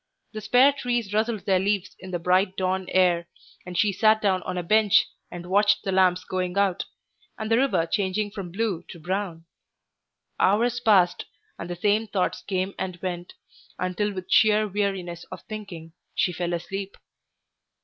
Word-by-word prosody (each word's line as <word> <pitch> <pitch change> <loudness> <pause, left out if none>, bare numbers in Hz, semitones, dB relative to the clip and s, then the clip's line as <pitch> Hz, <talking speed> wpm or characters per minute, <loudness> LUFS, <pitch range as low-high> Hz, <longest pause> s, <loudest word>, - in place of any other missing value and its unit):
The 215 - -5
spare 250 +6 +5
trees 240 -6 -2
rustled 215 -2 0
their 190 -3 +3
leaves 200 0 -1
in 185 - -10
the 180 - -2
bright 185 +2 +1
dawn 185 0 -1
air, 175 -2 +2 0.4
and 180 -1 -5
she 210 -2 +3
sat 215 +3 +4
down 190 -3 +1
on 180 0 -5
a 175 - -2
bench 215 +3 +4 0.2
and 175 0 -8
watched 205 +3 +3
the 195 - -2
lamps 185 -1 +3
going 185 0 -3
out, 195 -2 +1 0.5
and 220 0 -4
the 225 - +5
river 205 -11 +2
changing 200 +3 -1
from 190 -4 -7
blue 200 -3 -1
to 170 - -10
brown. 175 -1 -3 0.9
Hours 235 +5 +2
passed, 200 -7 +3 0.3
and 170 - -6
the 175 - -3
same 210 +5 +1
thoughts 190 -3 -1
came 190 0 -2
and 185 -2 -4
went, 175 -1 -4 0.4
until 185 +3 -1
with 185 -2 -7
sheer 215 0 +5
weariness 190 -4 -3
of - - -10
thinking 185 -7 -8 0.2
she 180 - +1
fell 175 0 -2
asleep. 190 +3 -5
190 Hz, 170 wpm, -25 LUFS, 180-210 Hz, 0.9 s, spare